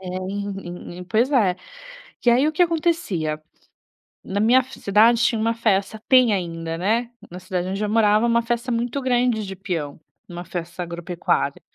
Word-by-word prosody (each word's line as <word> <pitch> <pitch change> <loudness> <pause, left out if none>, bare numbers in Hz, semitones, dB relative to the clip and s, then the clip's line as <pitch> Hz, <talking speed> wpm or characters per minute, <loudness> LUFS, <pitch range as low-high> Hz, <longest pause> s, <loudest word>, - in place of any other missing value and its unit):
É, 185 -1 -6
pois 235 +5 +2
é. 200 -9 +3 0.7
E - - +6
aí, 250 +5 +4
o - - +1
que 320 +3 +3
acontecia, 315 - -1 0.8
na 200 +1 -3
minha 235 +4 +5
f 260 +1 -13
cidade 225 +4 +4
tinha 230 -1 +2
uma 230 +1 +1
festa 215 -1 0
tem 255 -4 +5
ainda, 165 -3 -3
né, 225 +7 0 0.2
na 180 - -7
cidade 185 -1 -3
onde 195 +2 -3
eu 210 - -1
morava, 215 0 +3
uma 235 0 +3
festa 240 +2 -2
muito 240 +4 -2
grande 245 -4 +1
de 195 0 -7
peão, 170 -6 -4 0.3
uma 175 0 -8
festa 175 0 -5
agropecuária. 170 0 -2
210 Hz, 165 wpm, -22 LUFS, 180-235 Hz, 0.8 s, E